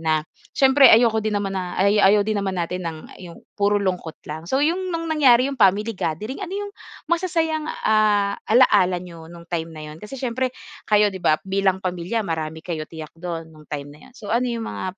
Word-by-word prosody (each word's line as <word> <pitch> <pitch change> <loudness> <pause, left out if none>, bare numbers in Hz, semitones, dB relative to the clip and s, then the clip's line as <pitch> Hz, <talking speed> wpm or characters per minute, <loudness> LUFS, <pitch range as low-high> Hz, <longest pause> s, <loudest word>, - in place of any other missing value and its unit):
na 155 -1 0 0.3
siyempre 270 0 +6
ayoko 225 -1 +5
din 215 -1 -1
naman 200 -1 -2
na 180 -1 -4
ay 200 +2 +3
ayaw 200 +1 +5
din 215 -2 -1
naman 190 -1 -3
natin 180 +1 -2
ng 160 -1 -7 0.2
'yong 175 -2 -11
puro 205 0 +1
lungkot 180 -5 -2
lang. 160 +3 -7
So, 270 +2 +2
'yong 365 +4 0
nung 330 -2 -3
nangyari 270 -6 +4
'yong 270 -4 -6
family 205 +3 +3
gathering, 205 - -4
ano 385 +1 -5
'yong 405 - -9 0.3
masasayang, 325 -2 0 0.2
ah, 210 -2 +3
alaala 205 -6 +4
ninyo 170 -2 -10
nung 170 0 -12
time 165 -1 -3
na 155 - -8
'yon? 155 - -13
Kasi 210 +6 -8
siyempre 255 0 -1 0.4
kayo 210 -1 +4
'di 190 - -7
ba, 155 - +3
bilang 190 -1 0
pamilya 185 +5 -2
marami 160 -1 -4
kayo 155 -3 -5
tiyak 160 -2 -9
do'n, 165 -2 -6
nung 155 -1 -17
time 145 -1 -6
na 150 - -17
'yon, 260 - -21
so 205 0 -6
ano 245 +2 +1
'yong 230 -1 -3
mga, - - -5
200 Hz, 210 wpm, -22 LUFS, 170-235 Hz, 0.4 s, siyempre